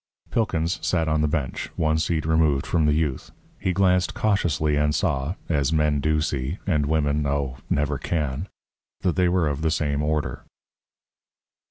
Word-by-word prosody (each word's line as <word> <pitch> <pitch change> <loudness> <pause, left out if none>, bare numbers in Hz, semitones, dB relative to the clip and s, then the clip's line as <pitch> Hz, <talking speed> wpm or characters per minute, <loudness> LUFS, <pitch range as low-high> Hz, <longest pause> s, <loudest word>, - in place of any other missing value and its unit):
Pilkins 90 -6 0
sat 85 -1 +1
on 75 0 +1
the 75 - +2
bench, 75 -4 -2
one 80 0 +1
seat 80 -1 0
removed 80 -4 +2
from 80 -3 +1
the 75 - +3
youth. 75 -4 -1 0.3
He 95 - 0
glanced 90 -1 +2
cautiously 85 -8 +1
and 75 0 +1
saw 75 -3 0
(as 70 -3 +1
men 75 -2 +2
do 75 +2 +1
see; 70 +3 -2
and 75 -7 +1
women 75 -1 +1
oh! 70 -3 -1
never 70 -1 0
can) 75 +1 -2 0.5
that 90 - +1
they 90 -2 +3
were 90 -3 +2
of 75 0 -2
the 80 - +1
same 75 -2 0
order. 75 0 -1
75 Hz, 165 wpm, -24 LUFS, 75-85 Hz, 0.5 s, the